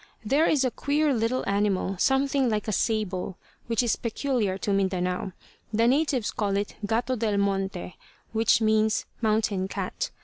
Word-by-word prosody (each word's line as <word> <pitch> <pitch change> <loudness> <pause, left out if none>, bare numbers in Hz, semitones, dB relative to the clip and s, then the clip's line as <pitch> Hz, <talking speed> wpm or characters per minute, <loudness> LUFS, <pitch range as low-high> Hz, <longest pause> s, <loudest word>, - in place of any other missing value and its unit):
There 290 +9 +3
is 285 -4 +3
a 255 - +1
queer 290 +2 +1
little 230 +2 0
animal, 200 -1 +1
something 270 +1 +2
like 215 -1 -1
a - - 0
sable, 200 -4 -1 0.3
which 230 +1 +1
is 235 - +2
peculiar 230 -4 -1
to 200 +1 -1
Mindanao. 185 -1 0 0.4
The 225 +1 +2
natives 265 -2 +2
call 200 -2 -1
it 205 0 -2
"gato 235 +5 0
del 215 -3 0
monte," 195 -3 -2 0.3
which 225 0 +3
means 220 0 +2 0.2
"mountain 215 -4 +1
cat." - - -3
220 Hz, 150 wpm, -26 LUFS, 200-250 Hz, 0.4 s, There